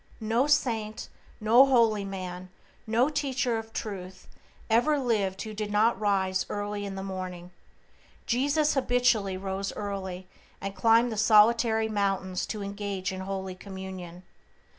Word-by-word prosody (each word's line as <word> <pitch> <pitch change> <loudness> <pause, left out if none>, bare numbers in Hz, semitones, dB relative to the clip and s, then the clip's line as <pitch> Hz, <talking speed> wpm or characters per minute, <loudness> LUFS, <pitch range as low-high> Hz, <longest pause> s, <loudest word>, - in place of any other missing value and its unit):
No 230 +5 +1
saint, 225 -7 0 0.3
no 225 +4 +6
holy 230 -6 +3
man, 185 -2 -6 0.4
no 230 +4 +3
teacher 275 -5 -1
of 225 0 -10
Truth 190 -4 -6 0.4
ever 240 +7 +3
lived 210 -8 0
who 220 -1 -7
did 210 0 -4
not 220 +3 +3
rise 190 -2 +1
early 205 0 -3
in 195 - -6
the 190 - -5
morning. 185 -2 -6 0.7
Jesus 285 +5 +2
habitually 245 -7 +2
rose 195 +1 -3
early, 190 -3 -5 0.3
and 195 0 -5
climbed 230 +2 +4
the 220 - -4
solitary 220 +1 +4
mountains 195 -3 -1
to 210 -2 -4
engage 200 -1 -4
in 190 - -6
holy 190 0 -4
communion. 185 -2 -8
205 Hz, 135 wpm, -28 LUFS, 190-230 Hz, 0.7 s, no